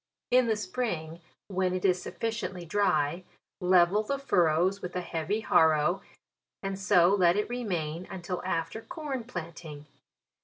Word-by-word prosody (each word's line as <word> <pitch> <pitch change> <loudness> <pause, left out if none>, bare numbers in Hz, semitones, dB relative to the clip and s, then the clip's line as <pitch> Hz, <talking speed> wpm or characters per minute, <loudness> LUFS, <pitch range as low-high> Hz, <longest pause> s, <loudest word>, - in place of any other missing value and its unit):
In 250 -1 +5
the 220 - +2
spring, 185 -6 -3 0.3
when 185 -2 0
it 185 - -2
is 185 -1 +3
sufficiently 195 -6 -4
dry, 175 -3 +1 0.4
level 180 +2 +4
the 275 +6 -2
furrows 180 - +2
with 180 0 -6
a 180 - 0
heavy 175 +5 -2
harrow, 160 0 +3 0.6
and 195 0 -3
so 195 -3 +5
lei 180 -3 +4
it 210 - 0
remain 180 -8 -3
until 180 -1 -5
after 165 +6 -2
corn 295 -5 -5
planting. 165 -7 -8
185 Hz, 140 wpm, -29 LUFS, 170-210 Hz, 0.6 s, In